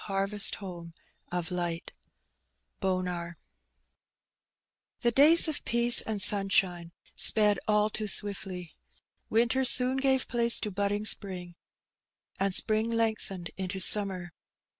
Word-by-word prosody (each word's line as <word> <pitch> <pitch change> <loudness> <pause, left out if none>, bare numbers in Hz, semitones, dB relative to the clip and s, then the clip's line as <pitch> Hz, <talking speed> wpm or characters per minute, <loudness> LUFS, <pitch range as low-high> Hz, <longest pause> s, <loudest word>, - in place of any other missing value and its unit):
barrest 195 +1 -1
home 170 -4 -10 0.4
of 175 -1 -4
light 175 -2 -4 0.9
^:±^ 180 -2 -3 1.7
HE 240 - +2
days 300 +8 +5
of 310 - -4
peace 235 0 +2
and 215 -2 -5
Banabine 190 -4 +1 0.3
sped 210 -2 +3
all 210 0 +2
too 215 0 -5
swiftly. 195 -4 -4 0.5
Winter 235 +4 +1
Boon 255 +1 +3
gave 265 -1 0
place 235 -1 +2
to 210 - -4
bodding 200 +2 -3
spring, 185 -5 0 0.9
and 195 -1 -1
spring 220 +1 +2
lengthened 220 -6 -3
into 190 0 -5
summer. 185 -3 +3
200 Hz, 110 wpm, -28 LUFS, 180-225 Hz, 1.7 s, days